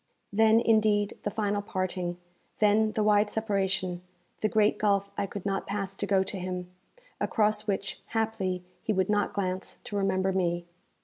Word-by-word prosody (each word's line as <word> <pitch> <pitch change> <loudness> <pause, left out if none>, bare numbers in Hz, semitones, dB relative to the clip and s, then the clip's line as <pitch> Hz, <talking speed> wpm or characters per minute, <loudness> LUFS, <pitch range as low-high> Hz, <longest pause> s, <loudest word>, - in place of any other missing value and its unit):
Then, 220 +1 +5
indeed, 215 -3 +3
the - - -1
final 205 -1 -1
parting, 185 -3 -2 0.4
then 215 +1 +3
the 215 - +1
wide 210 0 +4
separation, 195 -4 -1 0.4
the 215 - +1
great 215 -1 +3
gulf 200 -1 +2
I 200 - -1
could 200 0 -7
not 195 -1 -1
pass 195 -1 -2
to 200 +1 -3
go 195 -1 +3
to 190 0 -5
him, 180 0 -4 0.5
across 215 -1 +1
which, 200 -1 -2
haply, 215 -5 -1 0.2
he 215 - 0
would 190 -1 +1
not 205 -1 +1
glance 185 -2 -3
to 205 - -6
remember 190 -1 +1
me. 175 -2 0
200 Hz, 165 wpm, -28 LUFS, 190-215 Hz, 0.5 s, Then